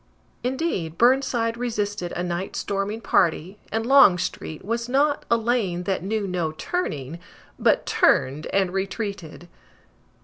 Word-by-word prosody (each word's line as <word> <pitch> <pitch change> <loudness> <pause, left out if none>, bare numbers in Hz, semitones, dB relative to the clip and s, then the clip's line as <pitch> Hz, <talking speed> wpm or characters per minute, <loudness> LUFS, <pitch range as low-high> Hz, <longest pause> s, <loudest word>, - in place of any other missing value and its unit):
Indeed, 250 - -2
Burnside 240 -2 +2
resisted 210 -6 -2
a 175 - -3
night 180 +1 -3
storming 200 +3 -2
party, 180 +1 +1
and 225 0 -1
Longstreet 190 - +3
was 235 +3 -2
not 285 +3 +1
"a 235 - +4
lane 220 -7 0
that 190 0 -1
knew 210 +2 -2
no 175 -4 -2
turning," 155 - -4 0.4
but - - +3
turned 140 +4 +2
and 190 -2 0
retreated! 195 -3 -4
200 Hz, 125 wpm, -24 LUFS, 175-235 Hz, 0.4 s, a